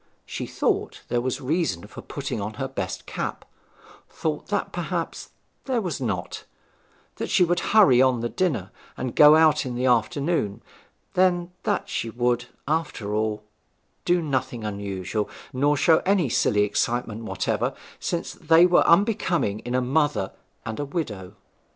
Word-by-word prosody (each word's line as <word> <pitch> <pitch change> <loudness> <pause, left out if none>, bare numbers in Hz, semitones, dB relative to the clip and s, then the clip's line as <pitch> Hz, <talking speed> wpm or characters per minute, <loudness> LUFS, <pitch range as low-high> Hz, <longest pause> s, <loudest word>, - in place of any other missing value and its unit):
She - - -5
thought - - -1
there 120 - +1
was 130 0 -2
reason 140 - -1
for - - -10
putting 105 - -5
on 105 +2 -4
her 135 - -3
best 135 - -5
cap, - - -4 0.6
thought - - -3
that - - -1
perhaps - - -3 0.4
there 260 -3 0
was 180 -9 -3
not; 95 -8 -3 0.7
that - - -4
she - - +4
would 175 0 +2
hurry 150 - +5
on 130 -3 +3
the 120 - 0
dinner 125 - -1 0.3
and 125 -1 -4
go 150 +1 +8
out 155 -1 +4
in 125 -3 -4
the 125 +1 -1
afternoon; 125 - +1 0.5
then 180 -1 +2
that - - 0
she 115 - -3
would, 120 +1 0 0.2
after 145 -9 -2
all, 105 0 -1 0.6
do 175 -1 +2
nothing 130 -5 -2
unusual, 100 0 -3 0.2
nor 145 +3 +2
show 160 +2 +5
any 185 -7 +1
silly 105 -2 +2
excitements 115 +2 -1
whatever, - - -1 0.2
since 170 - -3
they 165 +1 +5
were 180 -1 +4
unbecoming 175 - +2
in 120 +2 -4
a 130 - +2
mother 140 -6 +1 0.3
and 110 -1 -5
a 145 - -1
widow. 105 - -5
130 Hz, 150 wpm, -25 LUFS, 110-165 Hz, 0.7 s, go